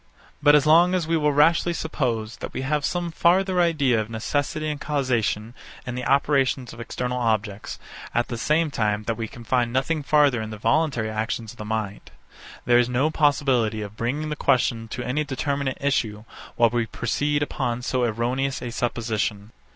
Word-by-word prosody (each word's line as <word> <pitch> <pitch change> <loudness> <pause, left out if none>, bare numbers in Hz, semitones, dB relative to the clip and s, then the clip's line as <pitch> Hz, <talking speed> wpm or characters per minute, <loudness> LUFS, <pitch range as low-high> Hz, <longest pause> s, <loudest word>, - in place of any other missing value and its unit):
But 145 0 +6
as 150 -1 +4
long 170 +4 +5
as 180 -3 0
we 165 - +1
will 150 -2 +2
rashly 165 +4 +3
suppose, 120 -9 -2
that - - -7
we 130 - -3
have 145 +2 0
some 175 +1 -1
farther 180 +2 +3
idea 140 -9 +2
of 110 - -7
necessity 145 +7 -2
and 150 -1 -3
causation 120 -6 -1 0.3
in 125 - -4
the 125 0 -4
operations 135 -3 +1
of 115 - -12
external 125 +1 -3
objects; 110 -3 -1 0.3
at 120 - 0
the 120 - -4
same 150 +6 +1
time, 105 -4 0
that 115 - -1
we 115 0 -4
can 120 - -12
find 120 0 +1
nothing 140 +5 0
farther 145 -4 +3
in 110 - -5
the 110 - -7
voluntary 115 -1 +1
actions 110 0 -3
of 120 - -17
the 105 - -5
mind; 105 -2 -4 0.6
there 120 0 +5
is 120 0 +2
no 130 +5 +1
possibility 130 -8 +2
of 105 0 -9
bringing 140 +7 -2
the 150 - -2
question 120 -5 +1
to 125 +2 -5
any 140 +5 -1
determinate 140 0 -2
issue, 110 -7 -1 0.3
while 115 -2 +4
we 120 -2 0
proceed 145 +6 -1
upon 120 -4 -2
so 125 0 0
erroneous 125 +4 -1
a 120 - -4
supposition. 110 -3 -2
125 Hz, 185 wpm, -24 LUFS, 115-150 Hz, 0.6 s, But